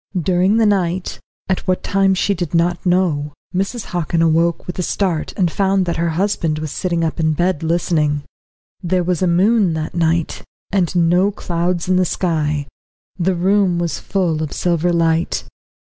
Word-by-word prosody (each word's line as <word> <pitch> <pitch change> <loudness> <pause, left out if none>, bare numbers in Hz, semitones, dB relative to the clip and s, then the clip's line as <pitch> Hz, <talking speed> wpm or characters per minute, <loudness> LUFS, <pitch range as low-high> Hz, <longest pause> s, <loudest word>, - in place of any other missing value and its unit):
During 185 +5 +2
the 225 - +4
night, 185 -3 0 0.3
at 190 - 0
what 185 0 0
time 195 -1 +2
she 200 +2 +1
did 175 -3 -3
not 175 +2 +1
know, 165 -5 +1 0.2
Mrs. 195 +5 -2
Hockin 170 -1 0
awoke 165 +1 +2
with 180 - -6
a - - +2
start, 180 -3 -1
and 180 -5 +1
found 195 -1 +1
that 170 - -2
her 170 +1 0
husband 175 -5 0
was 155 -1 -4
sitting 170 -1 -1
up 160 +1 -2
in 160 -1 +2
bed 175 0 0
listening. 160 -3 0 0.6
There 180 0 0
was 180 0 -1
a 185 - +2
moon 190 +2 +3
that 155 -1 -4
night, 165 -1 0 0.3
and 185 -3 0
no 175 +3 +3
clouds 175 -2 -2
in 185 0 +2
the 185 - +3
sky. 150 -5 -1 0.5
The 180 +1 +1
room 190 0 +2
was 170 -1 -2
full 175 -5 -1
of 155 - -4
silver 175 0 0
light. 165 0 +1
175 Hz, 175 wpm, -18 LUFS, 165-185 Hz, 0.6 s, the